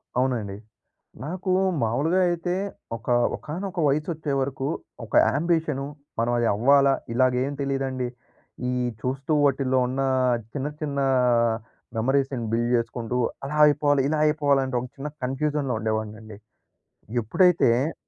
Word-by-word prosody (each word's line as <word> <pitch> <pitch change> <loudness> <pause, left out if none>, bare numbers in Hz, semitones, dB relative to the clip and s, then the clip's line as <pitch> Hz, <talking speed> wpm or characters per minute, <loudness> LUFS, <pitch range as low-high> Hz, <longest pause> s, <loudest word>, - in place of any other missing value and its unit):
అవునండి. 120 -6 -1 0.7
నాకు 185 +4 -3 0.3
మాములుగా 145 +11 +1
అయితే, 175 +1 -1 0.4
ఒక 115 - -20 0.3
ఒకానొక 180 +5 -6
వయసొచ్చే 150 +1 -1
వరకు, 135 0 -2 0.4
ఒక - - -17
యాంబిషను, 160 -4 0 0.3
మనం 120 +1 +1
అది 120 - +2
అవ్వాలా, 140 +5 +5 0.2
ఇలాగేం 130 +2 +2
తెలీదండి. 135 -2 -1 0.6
ఈ - - 0 0.3
చూస్తూ, 135 +4 -2
వాటిల్లో 130 -1 +2
ఉన్న, 130 +2 -2 0.5
చిన్న 140 0 -2
చిన్నా 140 -2 0 0.9
మెమోరీస్‌ని 135 0 0
బిల్డ్ 120 +1 +1
జేసుకుంటూ, 115 +1 -2 0.3
అలా 150 +2 -3
అయిపోవాలి, 145 -2 +3
ఇలా 155 -1 0
అయిపోవాలి. 145 -2 +2
అంటే, 130 -1 -2
ఒక 125 - -6
చిన్న 145 +2 -4 0.2
కన్ఫ్యూజన్‌లో 140 -1 -1
ఉండేవాడినండి. 110 -1 -4 0.9
ఎప్పుడైతే 140 - +3
135 Hz, 115 wpm, -25 LUFS, 125-150 Hz, 0.9 s, అవ్వాలా